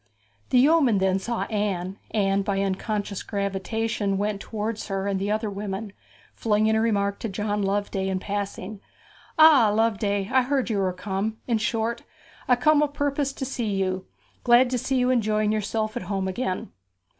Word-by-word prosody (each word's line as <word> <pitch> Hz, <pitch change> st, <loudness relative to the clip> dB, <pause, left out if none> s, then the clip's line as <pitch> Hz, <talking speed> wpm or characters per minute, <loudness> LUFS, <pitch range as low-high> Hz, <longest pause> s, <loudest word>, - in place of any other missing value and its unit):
The 255 Hz, -, +3 dB
yeoman 275 Hz, -4 st, +5 dB
then 190 Hz, 0 st, +2 dB
saw 235 Hz, +4 st, -2 dB
Anne, 200 Hz, -3 st, -2 dB
and 195 Hz, -2 st, +1 dB
by 200 Hz, -1 st, -1 dB
an 195 Hz, 0 st, +1 dB
unconscious 205 Hz, 0 st, -3 dB
gravitation 200 Hz, +1 st, -2 dB
went 205 Hz, 0 st, -1 dB
towards 215 Hz, +1 st, -4 dB
her 195 Hz, -1 st, -2 dB
and 200 Hz, -1 st, -1 dB
the 200 Hz, +1 st, -2 dB
other 215 Hz, +1 st, 0 dB
women, 200 Hz, 0 st, -5 dB, 0.4 s
flinging 215 Hz, 0 st, +2 dB
a 220 Hz, -, +2 dB
remark 200 Hz, -3 st, 0 dB
to 225 Hz, -, -3 dB
John 205 Hz, +2 st, -2 dB
Loveday 195 Hz, -1 st, -1 dB
in 190 Hz, -, 0 dB
passing. 200 Hz, +1 st, -4 dB, 0.6 s
'Ah, 310 Hz, -8 st, +7 dB
Loveday! 205 Hz, -2 st, +1 dB
I 260 Hz, -, +6 dB
heard 260 Hz, -1 st, 0 dB
you 205 Hz, -, 0 dB
were 190 Hz, -1 st, +1 dB
come; 195 Hz, +4 st, -3 dB
in 230 Hz, -3 st, +1 dB
short, 225 Hz, +2 st, -1 dB, 0.5 s
I 250 Hz, -, +5 dB
come 300 Hz, +4 st, +4 dB
o' 300 Hz, -, +3 dB
purpose 285 Hz, -1 st, -1 dB
to 270 Hz, -, -4 dB
see 235 Hz, -6 st, -2 dB
you. 190 Hz, -1 st, -2 dB, 0.4 s
Glad 245 Hz, +1 st, +5 dB
to 250 Hz, -, 0 dB
see 265 Hz, -, -1 dB
you 250 Hz, 0 st, +2 dB
enjoying 215 Hz, -3 st, +1 dB
yourself 215 Hz, +1 st, -1 dB
at 240 Hz, -, -3 dB
home 195 Hz, -2 st, -1 dB
again.' 190 Hz, -1 st, -3 dB
210 Hz, 175 wpm, -25 LUFS, 195-235 Hz, 0.6 s, Ah